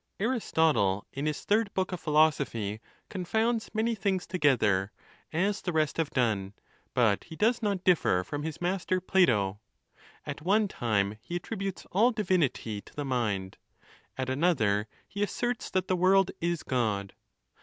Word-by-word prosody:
Aristotle, 160 - +1
in 140 +3 -2
his 150 - -3
third 210 0 +2
book 190 0 0
of 180 - -4
Philosophy, 140 -10 +1 0.3
confounds 220 +5 -1
many 225 +1 0
things 195 -3 -1
together, 110 - +2 0.4
as 195 +5 0
the 180 - -2
rest 155 -2 0
have 165 -3 0
done; 105 -6 0 0.4
but 115 -5 +2
he 165 - -10
does 230 +6 +2
not 200 -4 -1
differ 155 - +3
from 145 +10 -5
his 155 0 -5
master 185 +1 0
Plato. 115 - +2 0.7
At - - -5
one 205 +6 +3
time 105 - -1
he 175 - -4
attrib 205 +3 -6
utes 195 -2 -4
all 220 +6 +4
divinity 175 - 0
to - - -18
the 145 - -3
mind, 105 -8 -1 0.6
at 130 -1 -2
another 130 - +1 0.2
he 200 - -6
asserts 240 +3 -1
that 185 -1 -1
the 185 - +2
world 190 +1 +4
is 170 -1 -1
God. 105 -6 -1
160 Hz, 155 wpm, -29 LUFS, -, 0.7 s, all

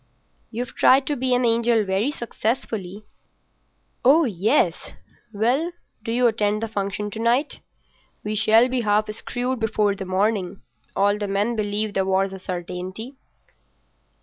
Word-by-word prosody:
"You've 240 +2 -5
tried 265 +1 +5
to 295 - -1
be 255 -1 +1
an 245 0 +1
angel 230 -1 +3
very 195 +7 0
successfully." 220 -6 -4 1.0
"Oh 295 +6 +6
ye—es!... 215 - 0 0.4
Well, 250 +11 0 0.3
do 230 - -3
you 245 +2 +2
attend 215 -2 +1
the - - -1
function 205 0 -3
to 220 - -6
night? 240 +6 +1 0.6
We 210 - -3
shall 220 +3 +5
be 255 -1 -1
half 215 0 +1
screwed 245 +3 -3
before 215 -2 +1
the 195 -1 -6
morning. 190 0 -1 0.3
All 205 +1 +2
the 205 - -2
men 205 +4 0
believe 210 0 -2
the 195 - +1
war's 190 0 0
a 190 - -7
certainty." 185 +6 -6
215 Hz, 145 wpm, -23 LUFS, 200-240 Hz, 1.0 s, Oh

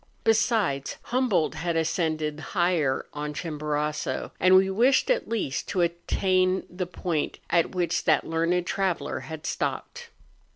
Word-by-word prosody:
Besides, 215 - +1
Humboldt 240 - +1
had 165 +1 -2
ascended 155 -2 -1
higher 170 -6 0
on 150 0 -4
Chimborazo; 150 -3 -2
and 185 0 +6
we 190 0 +6
wished 240 - +3
at - - 0
least 205 -11 -2
to 185 - 0
attain 185 +2 +1
the 180 0 -3
point 170 -3 -2
at 170 +2 +2
which 175 -2 0
that - - +3
learned 170 +2 0
traveller 190 -1 -1
had 160 -1 -8
stopped. 480 -1 -3
175 Hz, 130 wpm, -26 LUFS, 155-190 Hz, -, and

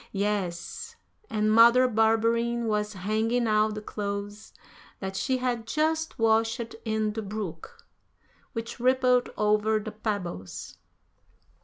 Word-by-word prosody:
Yes, 195 -4 -3 0.3
and 215 0 +1
Mother 235 +3 +7
Barberin 230 +1 +2
was 210 -1 -1
hanging 220 +5 0
out 215 0 +2
the 210 - -6
clothes 205 0 -5 0.5
that 190 0 -5
she 260 +6 0
had 245 -3 -2
just 315 +3 0
washed 225 +1 +1
in 220 -1 -1
the 220 - -3
brook, 215 - -7 0.7
which 230 +1 -5
rippled 250 0 +3
over 210 +1 +2
the 215 +1 -6
pebbles. 200 - -5
220 Hz, 115 wpm, -27 LUFS, 210-235 Hz, 0.7 s, Mother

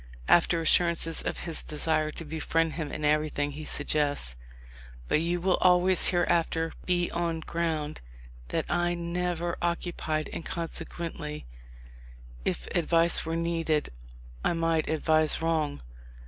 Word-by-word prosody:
After 170 0 +4
assurances 165 0 +3
of - - -3
his 165 -2 -3
desire 155 0 0
to 165 - -7
befriend 160 +1 0
him 155 -3 -4
in 155 - -3
everything, 150 -1 +1
he 150 +2 -7
suggests: 145 - 0 0.7
"But 150 - +2
you 175 +1 0
will 185 +1 +2
always 180 0 +4
hereafter 165 -2 +1
be 175 -1 +1
on 170 -1 -1
ground 160 -2 -2 0.5
that - - -1
I 175 0 +1
have 175 - -2
never 175 0 -2
occupied, 170 -3 -1
and - - -5
consequently, 165 -2 -5 1.0
if - - -2
advice 165 0 +3
were 165 - -1
needed, 165 -2 0 0.5
I - - +2
might 165 -1 0
advise 155 0 +2
wrong. 155 - -1
165 Hz, 130 wpm, -28 LUFS, 155-170 Hz, 1.0 s, After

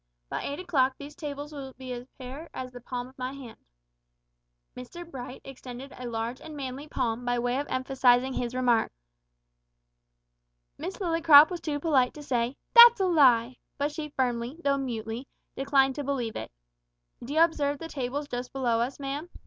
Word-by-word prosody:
By - - -3
eight 285 +3 -4
o'clock 275 -8 +1
these 285 +1 -9
tables 295 -1 -6
will 270 -2 -7
be 260 -1 -6
as 245 +1 -7
bare 270 +6 -8
as 255 -1 -5
the 245 -1 -10
palm 245 0 -5
of 260 - -22
my 255 +1 -3
hand." 265 -5 -10 1.2
Mr 345 +8 -9
Bright 255 -4 -8
extended 260 0 -9
a 250 - -7
large 230 +2 -3
and 310 -2 -9
manly 270 +1 -6
palm 245 -4 -2
by 245 0 0
way 245 +2 0
of 290 - -3
emphasising 260 0 +2
his 245 0 -3
remark. 245 -3 +2 1.8
Miss 190 - -6
Lillycrop 330 -4 +7
was 350 - -4
too 295 -2 -2
polite 280 -5 +2
to 300 - -9
say, 245 -1 -1 0.2
"That's 475 -1 +10
a 385 - +2
lie!" 260 -8 +4 0.2
but 285 +1 0
she 300 0 -5
firmly, 250 0 -2
though 275 -1 +2
mutely, 235 -1 -4 0.3
declined 270 0 +3
to 290 - -4
believe 255 -5 -2
it. - - -6 0.7
"D'you 285 +6 -1
observe 295 -4 +3
the 325 - -7
tables 285 0 -3
just 245 -1 -5
below 245 -4 0
us, 250 +4 -2
ma'am?" 285 +4 -4
265 Hz, 175 wpm, -28 LUFS, 245-290 Hz, 1.8 s, That's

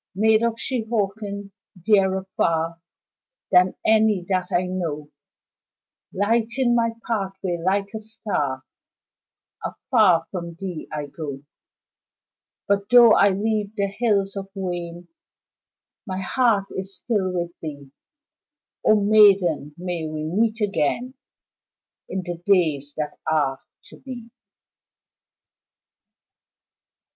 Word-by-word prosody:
Maid 220 +2 +4
of 235 -1 +1
Shehawken, 210 -4 -3 0.3
dearer 190 0 +2
far 165 0 0 0.7
Than 180 0 +5
any 215 -4 +3
that 185 -2 0
I 180 +1 +2
know, 160 -5 -4 1.0
Lighting 235 +5 +1
my 230 -1 +2
pathway 195 -5 -2
like 195 +2 +1
a 220 - -4
star, 205 -12 -3 1.0
Afar 185 -9 +2
from 170 -3 -5
thee 180 -3 -6
I 150 -1 -3
go, 145 -2 -7 1.2
But 200 0 0
tho' 240 -1 +8
I 200 - +5
leave 210 +1 -1
the 200 -2 +1
Hills 200 -2 0
of 195 -1 -5
Wayne 175 -2 -5 1.0
My 190 -1 -3
heart 210 0 +2
is 190 0 -6
still 195 -2 -1
with 175 -1 -2
thee, 145 -3 -8 0.9
O 215 -1 +5
maiden, 195 -8 +4
may 175 -2 -3
we 155 0 -4
meet 215 +8 0
again 210 - 0 1.0
In 190 - -3
the 175 -1 -6
days 155 -7 +1
that 150 -1 -4
are 135 -4 +1 0.2
to 190 - -14
be. 245 -3 -9
195 Hz, 105 wpm, -23 LUFS, 170-215 Hz, 1.2 s, tho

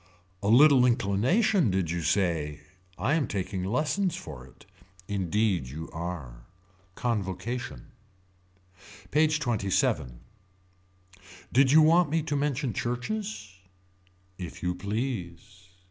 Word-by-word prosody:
A 100 - -2
little 135 +3 +7
inclination 125 - +2
did 90 -4 0
you 85 0 -2
say 80 -3 0 0.4
I 120 - 0
am 155 -6 +1
taking 95 -1 -3
lessons 150 - 0
for 65 +1 -9
it. 65 - -19 0.4
Indeed 100 - 0
you 80 +5 -7
are. 75 -9 -6 0.5
Convocation. 120 +5 -3 1.2
PAGE 155 +1 +3
XXVII. 100 - 0 1.4
Did 130 +1 +5
you 155 +1 +7
want 165 +1 +5
me 160 +1 0
to 150 -1 -2
mention 140 -3 -1
churches. 125 - -4 0.9
If 90 -1 -8
you 90 0 0
please. 95 -2 -5
110 Hz, 105 wpm, -28 LUFS, 90-140 Hz, 1.4 s, little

